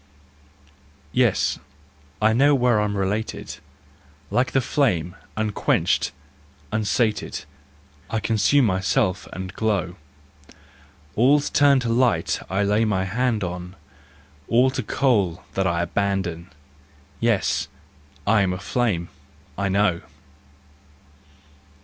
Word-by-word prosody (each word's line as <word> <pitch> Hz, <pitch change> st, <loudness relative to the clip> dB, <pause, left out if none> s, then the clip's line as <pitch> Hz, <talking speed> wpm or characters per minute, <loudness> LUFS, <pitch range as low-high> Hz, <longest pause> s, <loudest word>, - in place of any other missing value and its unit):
Yes, -, -, +2 dB, 0.6 s
I 110 Hz, +1 st, +3 dB
know 140 Hz, +5 st, +4 dB
where 125 Hz, -4 st, +3 dB
I'm 105 Hz, -1 st, -1 dB
related, 100 Hz, +3 st, -3 dB, 0.7 s
Like 130 Hz, +1 st, +1 dB
the 135 Hz, -, +3 dB
flame, 95 Hz, -, 0 dB, 0.2 s
unquenched, 110 Hz, -1 st, +1 dB, 0.6 s
unsated, 110 Hz, +1 st, -1 dB, 0.6 s
I 110 Hz, -, -1 dB
consume 115 Hz, +5 st, +3 dB
myself 95 Hz, -2 st, 0 dB
and 95 Hz, -1 st, -6 dB
glow: 100 Hz, -5 st, -1 dB, 1.2 s
All's 140 Hz, +5 st, +3 dB
turned 140 Hz, -3 st, +4 dB
to 120 Hz, -, -2 dB
light 115 Hz, -8 st, +2 dB
I 95 Hz, +2 st, 0 dB
lay 105 Hz, +2 st, +2 dB
my 100 Hz, -4 st, 0 dB
hand 115 Hz, +1 st, 0 dB
on, 90 Hz, +1 st, -5 dB, 0.7 s
All 125 Hz, +3 st, +4 dB
to 130 Hz, -, -2 dB
coal 105 Hz, -8 st, +1 dB
that 95 Hz, -1 st, 0 dB
I 85 Hz, -1 st, 0 dB
abandon, 90 Hz, -2 st, -2 dB, 0.7 s
Yes, -, -, +1 dB, 0.6 s
I 105 Hz, -1 st, +4 dB
am 95 Hz, -2 st, +1 dB
a -, -, -4 dB
flame, 105 Hz, -8 st, -1 dB, 0.5 s
I 100 Hz, 0 st, -1 dB
know! 95 Hz, -3 st, +2 dB
105 Hz, 105 wpm, -23 LUFS, 95-120 Hz, 1.2 s, know